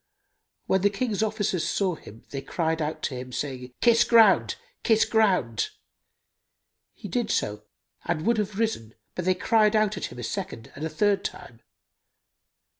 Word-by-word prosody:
When 190 - +2
the 205 - +4
King's 210 0 -2
officers 210 -5 0
saw 190 -3 0
him, 115 -8 -12
they 135 - -4
cried 160 +3 -1
out 150 +1 -3
to - - -1
him, 125 0 -7
saying, 130 -2 -5
"Kiss 235 -1 +5
ground! 225 -4 +5 0.3
Kiss 220 -2 +3
ground!"[FN#298] 185 - +2 1.3
He - - -8
did - - -1
so 105 0 -1 0.4
and 170 -2 -1
would 230 0 +2
have 205 -1 -3
risen, 215 - -2 0.2
but 180 - -4
they 185 0 +3
cried 215 +2 +3
out 215 -2 +2
at - - -3
him - - -9
a 120 - -6
second 180 - -5
and 145 - -8
a 160 - -1
third 200 +6 +1
time. 175 -11 -7
185 Hz, 165 wpm, -26 LUFS, 140-215 Hz, 1.3 s, Kiss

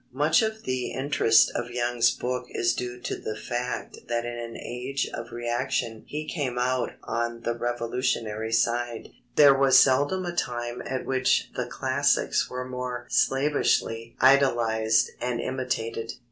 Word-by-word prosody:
Much 150 - +3
of 220 0 -2
the 130 -1 -2
interest 130 -3 +3
of 120 0 -3
Young's 120 -1 +2
book 125 0 -3
is 120 - +1
due 125 0 -5
to 120 - -3
the 110 - -5
fact 120 +3 -4
that 120 0 -1
in 120 0 -4
an 115 -1 -6
age 130 +3 -3
of 115 +1 -6
reaction 120 -1 -2
he 150 +1 -4
came 135 -7 -3
out 125 0 0
on 115 +1 -2
the 120 - -1
revolutionary 115 -2 -2
side. 120 0 0 0.3
There 145 -2 +8
was 135 -1 +5
seldom 145 +8 +4
a 175 0 -4
time 120 -5 -3
at 130 -1 -3
which 130 -1 +1
the 125 - -2
classics 135 +3 +1
were 125 0 -4
more 125 -1 -5
slavishly 135 -5 +1
idolized 115 -4 +3
and 125 -1 -1
imitated. 115 -3 -3
125 Hz, 145 wpm, -26 LUFS, 120-130 Hz, 0.3 s, There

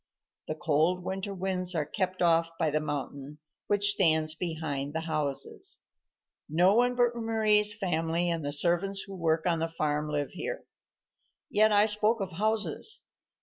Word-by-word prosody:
The 155 - -3
cold 165 +3 +1
winter 190 +2 -4
winds 185 -1 0
are 155 -2 0
kept 185 +1 -2
off 165 -1 +3
by 155 -2 0
the 155 - +1
mountain 145 -1 -5 0.3
which 205 0 +5
stands 160 -5 +2
behind 155 -4 -4
the 160 - -2
houses. 155 -4 -3 0.7
No 175 +5 +4
one 245 +2 +3
but 240 -1 +2
Mari's 215 -2 +2
family 170 -3 -1
and 165 -2 -2
the 145 - -2
servants 175 +6 +1
who 195 -1 -9
work 160 -2 0
on 170 -2 +1
the 165 - 0
farm 150 -2 -2
live 145 -1 -2
here. - - -5 0.9
Yet 215 +1 +4
I 205 0 +5
spoke 215 +2 +2
of 195 -2 -4
houses. 215 - -1
175 Hz, 155 wpm, -29 LUFS, 155-205 Hz, 0.9 s, which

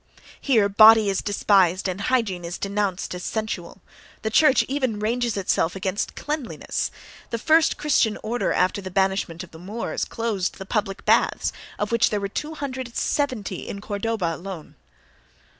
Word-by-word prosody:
Here 225 -7 +3
body 215 +1 +7
is 195 - -1
despised 195 -3 +2
and 185 +1 -3
hygiene 210 -7 0
is 170 +1 -5
denounced 200 -2 -2
as 180 0 -6
sensual; 195 -5 -4 0.4
the 220 - -1
church 280 +2 +5
even 260 -5 -1
ranges 235 +1 0
itself 180 -2 0
against 190 +1 -2
cleanliness 295 -4 -3 0.4
(—the 230 - -2
first 315 +7 +3
Christian 250 -7 +2
order 235 +3 -1
after 185 +2 +1
the 190 - -6
banishment 190 -2 0
of 185 - -13
the 160 - -12
Moors 205 +7 -4
closed 220 -5 -2
the 190 - -7
public 200 -1 -2
baths, - - +2 0.2
of - - -2
which 235 0 +3
there 210 - -1
were 200 - -2
270 260 - -3
in 200 - -5
Cordova 205 -3 -2
alone). 180 -2 -8
205 Hz, 150 wpm, -24 LUFS, 190-235 Hz, 0.4 s, body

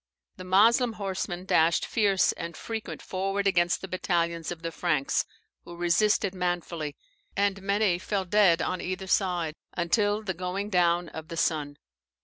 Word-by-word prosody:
The 185 - -8
Moslem 225 +6 +4
horseman 190 -3 -4
dashed 165 -2 +3
fierce 200 -4 +2
and 170 0 -7
frequent 225 -1 -6
forward 195 +2 -2
against 175 -3 +2
the 190 - -6
battalions 170 -3 -1
of 170 -1 -7
the 165 - -3
Franks, 150 -6 0 0.4
who 175 - -10
resisted 185 +3 +2
manfully, 175 -4 -3 0.4
and 200 -1 +1
many 200 -2 +1
fell 195 0 -2
dead 180 -3 +4
on 185 -1 -2
either 185 +1 -4
side, 180 -4 0 0.2
until 205 +4 +1
the 190 -3 -2
going 185 +4 -4
down 175 -2 +2
of 160 0 -8
the 165 -1 -7
sun. 150 -3 0
180 Hz, 150 wpm, -27 LUFS, 170-200 Hz, 0.4 s, Moslem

